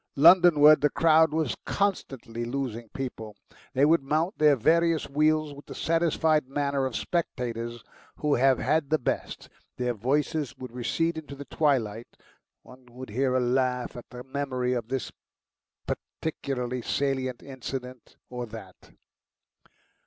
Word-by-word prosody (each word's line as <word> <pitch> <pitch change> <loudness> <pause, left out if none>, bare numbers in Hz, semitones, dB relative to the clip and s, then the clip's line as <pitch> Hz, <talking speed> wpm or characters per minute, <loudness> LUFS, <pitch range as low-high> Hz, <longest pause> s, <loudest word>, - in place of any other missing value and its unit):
Londonward 155 -2 +7
the 150 - +4
crowd 160 0 +4
was 155 -4 -1
constantly 135 - -2
losing 120 -2 -4
people; 115 -5 -6 0.4
they 135 +1 +4
would 165 +1 +4
mount 155 +7 0
their 150 -1 +6
various 165 +5 +2
wheels 155 +1 +1
with 140 +1 -13
the - - -8
satisfied 160 -3 +1
manner 140 -1 -1
of 125 - -7
spectators 120 -8 -3 0.3
who 150 -1 0
have 130 0 +4
had 145 +2 0
the 155 - +3
best. 125 - -3 0.3
Their 125 -1 -1
voices 145 +5 -1
would 130 -2 -8
recede 160 +7 -1
into 145 -2 -10
the 140 +1 -9
twilight; 120 -7 0 0.6
one 125 0 -16
would 125 -1 -10
hear 130 +3 0
a - - +3
laugh 125 0 0
at 120 - -10
the 125 0 -9
memory 130 -2 -2
of 120 -3 -3
this 130 +1 -3 0.7
particularly 125 -5 -4
salient 130 -1 -2
incident 130 -2 -7
or 125 -1 -6
that. 105 -4 -12
135 Hz, 140 wpm, -27 LUFS, 125-155 Hz, 0.7 s, Londonward